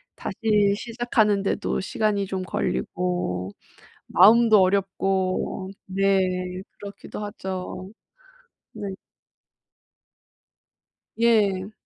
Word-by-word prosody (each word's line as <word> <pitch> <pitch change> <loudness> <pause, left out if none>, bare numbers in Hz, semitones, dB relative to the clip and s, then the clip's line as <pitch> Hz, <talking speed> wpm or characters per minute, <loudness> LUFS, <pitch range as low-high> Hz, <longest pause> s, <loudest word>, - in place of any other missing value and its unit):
다시 210 -3 +1
시작하는데도 220 -4 0
시간이 205 0 0
좀 190 0 -3
걸리고 175 - -2 0.6
마음도 220 +2 +6
어렵고 190 0 0 0.2
네. 195 +1 +2 0.6
그렇기도 205 +1 -8
하죠. 190 -1 -6 0.8
네. 200 - -5 2.3
예. 210 -4 +2
195 Hz, 150 characters per minute, -24 LUFS, 185-210 Hz, 2.3 s, 마음도